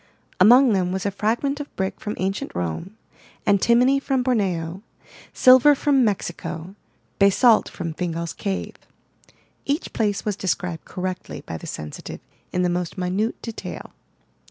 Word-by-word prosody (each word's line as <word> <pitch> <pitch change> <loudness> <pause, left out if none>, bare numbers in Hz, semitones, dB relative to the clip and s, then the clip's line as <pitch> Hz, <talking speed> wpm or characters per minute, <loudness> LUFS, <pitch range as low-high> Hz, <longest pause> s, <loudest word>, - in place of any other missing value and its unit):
Among 240 +5 +7
them 180 -2 +1
was 190 +1 -3
a 200 - +1
fragment 240 +8 -1
of 290 - -8
brick 190 0 -3
from 210 - -4
ancient 195 +2 -3
Rome, 90 - -4 0.5
Antimony 235 +7 +4
from 270 -2 0
Borneo, 190 -8 -1 0.5
Silver 260 +3 +6
from 275 -1 +3
Mexico, 180 -4 -3 0.5
Basalt 215 +4 +5
from 165 -2 -5
Fingal's 170 -1 -3
Cave. 195 -2 -4 0.9
Each 290 +5 -2
place 210 -3 -1
was 210 -2 -1
described 180 -3 -3
correctly 185 0 -5
by 80 - -6
the - - -10
sensitive 75 -1 -7 0.3
in 180 - 0
the - - +3
most 175 +1 -2
minute 185 +5 -1
detail. 230 -1 -7
195 Hz, 135 wpm, -23 LUFS, 180-240 Hz, 0.9 s, Among